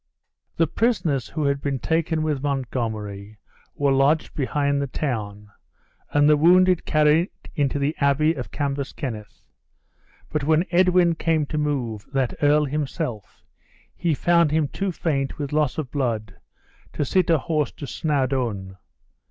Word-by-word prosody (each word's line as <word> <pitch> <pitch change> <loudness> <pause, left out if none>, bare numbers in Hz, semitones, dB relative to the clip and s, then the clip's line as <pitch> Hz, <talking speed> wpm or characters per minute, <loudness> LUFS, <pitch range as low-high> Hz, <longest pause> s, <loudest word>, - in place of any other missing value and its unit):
The 165 - +4
prisoners 160 - 0
who 155 0 -3
had 140 0 0
been 140 -2 -1
taken 160 +2 0
with 150 -4 -1
Montgomery 110 -7 -3 0.4
were 140 -1 +1
lodged 140 +4 +2
behind 140 0 0
the 140 - -2
town, 105 -7 -4 0.6
and 145 0 +3
the 150 - +6
wounded 180 +3 +4
carried 155 +3 +3 0.2
into 145 -3 0
the 145 +2 0
Abbey 150 +3 +3
of 130 -6 -6
Cambus 140 -1 -3
Kenneth; 110 -6 -7 0.9
but 150 -2 -1
when 160 +4 +3
Edwin 180 -1 +4
came 160 -2 0
to 155 - -4
move 125 -8 -2
that 135 -3 0
earl 150 +1 +4
himself, 145 - -4 0.5
he 165 -3 0
found 170 +1 +3
him 150 -1 +1
too 195 -1 -2
faint 140 -5 -2
with 145 -3 -4
loss 150 -3 +1
of 150 -5 -4
blood 110 -8 -2 0.6
to 145 - -1
sit 185 +6 +1
a 165 - +5
horse 150 0 -1
to 145 - -8
Snawdoun. 130 -11 -2
145 Hz, 145 wpm, -23 LUFS, 130-155 Hz, 0.9 s, the